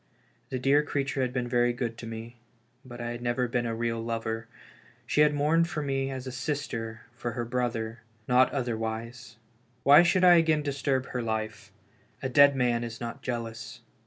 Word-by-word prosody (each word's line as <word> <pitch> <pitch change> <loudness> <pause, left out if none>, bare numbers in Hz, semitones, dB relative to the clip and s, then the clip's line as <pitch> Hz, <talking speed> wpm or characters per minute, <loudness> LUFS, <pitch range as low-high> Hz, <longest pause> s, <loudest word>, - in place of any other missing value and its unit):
The 130 - -2
dear 135 +3 +4
creature 140 -2 -2
had 125 -1 0
been 125 -1 -2
very 120 0 +2
good 120 -2 -3
to 115 - -7
me, 115 +1 -8 0.5
but 120 -2 -10
I 120 0 -3
had 120 0 -6
never 120 +1 0
been 120 0 -1
a 115 - -2
real 115 0 -1
lover; 115 0 -3 0.6
she 150 - +2
had 150 0 +6
mourned 155 +4 +2
for 150 -2 -3
me 135 -1 -1
as 130 -1 -5
a 130 - -5
sister 125 -4 -4
for 120 -1 -4
her 120 0 -3
brother, 115 -2 -2 0.3
not 125 +1 +4
other 125 -4 -1
wise! 115 +1 -5 0.5
Why 145 +3 +8
should 175 +2 +3
I 175 -1 +8
again 160 -2 +3
disturb 135 -2 -1
her 125 - -2
life? 110 -1 -4 0.5
A 130 - -1
dead 140 +2 +6
man 120 -2 +1
is 115 -1 -6
not 120 +3 -6
jealous. 120 -1 -5
125 Hz, 190 wpm, -28 LUFS, 115-135 Hz, 0.6 s, Why